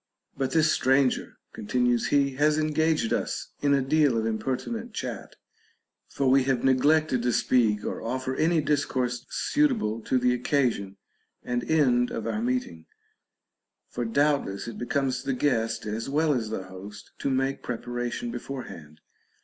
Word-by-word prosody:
But 135 -1 -1
this 160 -1 +3
stranger 130 0 +1 0.2
(continues 120 +2 0
he) 140 -1 +2
has 150 +1 +3
engaged 155 -4 +1
us - - -2
in 140 -1 +3
a 135 - +1
deal 145 -3 +3
of 110 - 0
impertinent 135 - -3
chat, - - -5 0.7
for 135 - -1
we 130 0 +4
have 135 -2 0
neglected 135 +1 +3
to 120 0 +1
speak 110 -4 +2
or - - -4
offer 130 +3 -3
any 165 +2 +2
discourse 130 -5 -1
suitable 245 - 0
to 130 - +2
the 125 0 +2
occasion 120 -6 0 0.5
and 120 -1 -2
end 125 -6 +3
of 110 - -5
our 110 -1 -2
meet 125 +1 0
ing; 80 -1 -14 1.0
for 120 - -3
doubtless 140 -4 0
it 115 - -7
becomes 130 +1 -1
the 135 0 -2
guest, 115 -4 0
as 110 +4 -3
well 150 +2 +2
as 115 -5 -2
the 110 -3 -4
host, 100 +3 -11
to - - -1
make 135 +1 0
preparation 120 - -4
beforehand. 85 - -8
130 Hz, 150 wpm, -26 LUFS, 115-145 Hz, 1.0 s, we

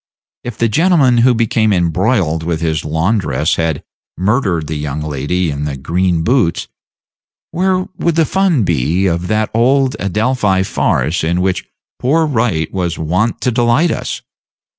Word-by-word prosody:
If 120 -3 -6
the 115 - +2
gentleman 140 - +3
who 125 +1 +4
became 110 -1 +1
embroiled 90 -1 +1
with 80 0 -2
his 80 -1 -1
laundress 80 - 0
had 80 -4 -1 0.3
murdered 95 - 0
the 80 - -5
young 75 0 -4
lady 75 +4 -2
in 70 +1 -4
the 70 -2 -4
green 85 +4 0
boots, 115 -6 +1 0.8
where 185 +2 +1 0.2
would 170 -2 0
be 165 - +3
the - - 0
fun 180 - +1 0.4
of 85 0 -1
that 110 +2 0
old 130 +3 +2
Adelphi 105 -1 0
farce 85 -3 0
in 85 +2 0
which 95 0 -1 0.3
poor 160 +6 +2
Wright 115 - -1
was 90 -3 -2
wont 90 +9 -1
to 125 - +1
delight 120 +8 +2
us? - - -4
95 Hz, 150 wpm, -15 LUFS, 80-125 Hz, 0.8 s, who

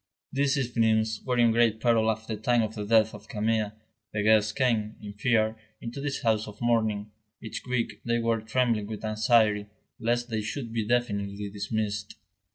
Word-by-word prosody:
These 140 +1 +2
evenings 110 -4 +1
were 125 -1 0
in 120 -1 +5
great 115 -1 +3
peril 115 -1 +3
at 110 0 -2
the 110 - -3
time 115 +2 +2
of 110 0 -3
the 105 -2 -4
death 110 0 +4
of 105 +1 -11
Camille. 110 -1 0 0.4
The 105 0 0
guests 105 -1 +4
came, 115 -4 0
in 105 -1 -8
fear, 110 0 +1 0.2
into 120 +4 -6
this 140 -1 -3
house 110 -1 +2
of 105 0 -10
mourning; 110 -3 +1 0.3
each 110 - -6
week 115 -4 -1
they 120 0 +1
were 115 -1 0
trembling 110 -2 0
with 110 0 -6
anxiety, 110 -1 +3 0.3
lest 120 +1 0
they 110 -1 0
should 115 +2 -5
be 110 -2 -1
definitely 100 -4 -1
dismissed. 105 0 -3
110 Hz, 175 wpm, -27 LUFS, 105-120 Hz, 0.4 s, in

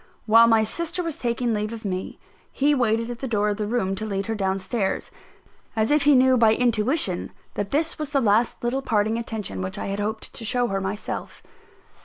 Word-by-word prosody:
While 230 +1 +7
my 225 -1 +4
sister 335 +10 -2
was 330 -3 -4
taking 235 -1 0
leave 210 0 -2
of 225 -1 -8
me, 185 -1 -4 0.3
he 290 +2 +2
waited 230 -3 +1
at 240 - -7
the 265 - -4
door 210 -3 +1
of 205 - -2
the 210 -1 -2
room 210 -4 0
to 215 - -4
lead 200 -2 -2
her 225 - -2
down 195 -2 0
stairs, 195 +1 -2 0.6
as 220 +2 +1
if 295 -1 +3
he 290 -1 +6
knew 260 0 +5
by 225 -2 +5
intuition 230 - +1 0.2
that 205 -1 -3
this 310 +6 -1
was 305 -2 -3
the 280 -1 +1
last 225 0 +2
little 250 +3 0
parting 220 -1 +1
attention 210 - -5
which 95 0 -4
I - - -4
had 200 - -4
hoped 220 +1 -3
to - - -4
show 245 +2 +1
her 195 0 -1
myself. 195 +2 -5
225 Hz, 215 wpm, -24 LUFS, 205-245 Hz, 0.6 s, While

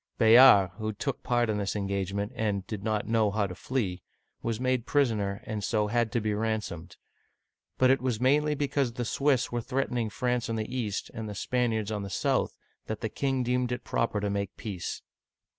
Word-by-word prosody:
Bayard, 115 -5 +8
who 110 0 -2
took 130 +6 -3
part 120 -1 +1
in 105 -1 0
this 100 0 -2
engagement 100 +1 -2
and 100 -3 -1
did 105 -1 -6
not 110 -1 0
know 110 -1 +2
how 105 0 0
to 95 - -5
flee, 95 -5 -2 0.4
was 115 -1 -2
made 130 -1 0
prisoner, 110 -8 +1
and 105 -1 -4
so 105 0 +1
had 120 0 +1
to 120 - +2
be 105 -1 -1
ransomed. 105 -6 -3 0.8
But 130 0 +5
it 135 - +2
was 125 -4 -1
mainly 150 +4 +3
because 140 -3 0
the 120 0 -3
Swiss 135 +1 +1
were 120 0 -1
threatening 125 -2 -1
France 125 +2 -1
on 115 - -1
the 110 +3 -4
east, 105 -6 -3
and 110 -1 -5
the 105 - -6
Spaniards 110 -1 0
on 105 -1 -2
the 100 - -5
south, - - 0 0.3
that 110 - -4
the 110 - -2
king 135 +2 -1
deemed 125 0 0
it 125 0 -3
proper 115 -3 0
to 100 0 -1
make 100 -1 -3
peace. 95 -6 -5
110 Hz, 195 wpm, -28 LUFS, 105-125 Hz, 0.8 s, Bayard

